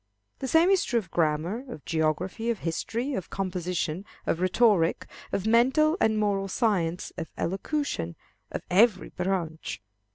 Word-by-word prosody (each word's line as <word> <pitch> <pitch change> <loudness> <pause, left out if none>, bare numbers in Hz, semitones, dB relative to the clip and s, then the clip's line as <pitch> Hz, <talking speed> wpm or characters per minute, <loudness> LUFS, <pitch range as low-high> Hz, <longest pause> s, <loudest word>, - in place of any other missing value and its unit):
The 265 - -3
same 325 +7 +5
is 385 - +4
true 240 - 0
of 195 -7 -3
grammar, 165 +8 0
of 155 - -9
geography, 165 +8 -1
of 235 - +1
history, 230 - -2
of 190 -9 -4
composition, 180 -2 -2 0.2
of 165 - 0
rhetoric, 185 -2 +3 0.3
of 200 - -1
mental 265 +8 +4
and 220 -1 +3
moral 200 -2 +1
science, 185 -5 0
of 165 - -5
elocution, 190 - -2 0.4
of - - -4
every 205 +1 +4
branch. 180 -4 -3
195 Hz, 140 wpm, -27 LUFS, 170-235 Hz, 0.4 s, same